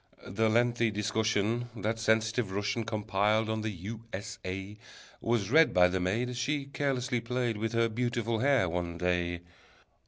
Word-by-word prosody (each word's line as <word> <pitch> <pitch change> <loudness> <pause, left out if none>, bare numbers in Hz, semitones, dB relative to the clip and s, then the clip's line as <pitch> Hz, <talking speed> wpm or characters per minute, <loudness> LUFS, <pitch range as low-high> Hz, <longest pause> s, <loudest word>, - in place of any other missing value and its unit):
The 110 +3 +1
lengthy 120 0 +2
discussion 110 +2 0
That 110 +2 -2
sensitive 110 0 +1
Russian 105 +3 -1
Compiled 110 0 +1
on 110 0 -2
the 110 - -2
U. 105 +4 -7
S. 100 +1 -6
A. 95 +3 -5 0.4
Was 115 -3 0
read 160 +3 +5
by 90 0 +6
the 95 +1 -1
maid, 100 +7 0
As 125 -1 -5
she 140 +3 -1
carelessly 135 -3 -1
played 120 -1 -1
With 115 +2 -2
her 115 0 +3
beautiful 115 0 -1
hair 135 -6 +3
one 85 0 -3
day. 85 0 0
110 Hz, 160 wpm, -30 LUFS, 100-120 Hz, 0.4 s, by